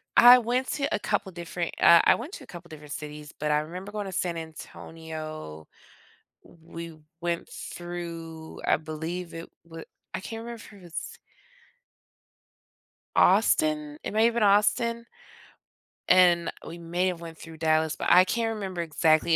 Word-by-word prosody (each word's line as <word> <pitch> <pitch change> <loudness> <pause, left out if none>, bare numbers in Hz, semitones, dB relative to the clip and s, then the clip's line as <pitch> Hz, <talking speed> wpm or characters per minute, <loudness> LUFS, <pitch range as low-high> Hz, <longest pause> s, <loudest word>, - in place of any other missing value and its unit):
I 245 +1 +10
went 250 +2 0
to 285 -2 0
a - - -2
couple 190 - -1
different, 170 0 -4
uh, 170 0 +8
I - - +6
went 285 +11 -7
to - - -8
a - - -15
couple 175 -1 -11
different 150 -2 -9
cities, 150 -1 -8
but 150 0 0
I 150 - +4
remember 180 +6 -7
going 210 -1 -4
to 190 - -5
San 175 -2 -1
Antonio. 155 - -8 0.8
We 165 0 -10 0.2
went 170 -1 -2
through, 165 -2 -7
I - - +4
believe 160 +3 -5
it 165 0 -7 0.2
wa 165 -1 -10 0.3
I - - -2
can't 225 +3 -6
remember 235 -1 -7
if 195 - -16
it's 170 -2 -7 2.0
Austin, 305 -1 +3
it - - -4
may 220 +2 +3
have 235 - +3
been 235 - +2
Austin 210 +3 +3 1.0
and 175 -2 +5
we 165 - -8
may 175 +2 -1
have 180 -2 -2
went 165 -1 -9
through 160 0 -11
Dallas, 160 0 +2
but - - -1
I 180 +1 +8
can't 225 +3 0
remember 190 -4 -4
exactly, 160 0 +3
170 Hz, 160 wpm, -27 LUFS, 160-205 Hz, 2.0 s, I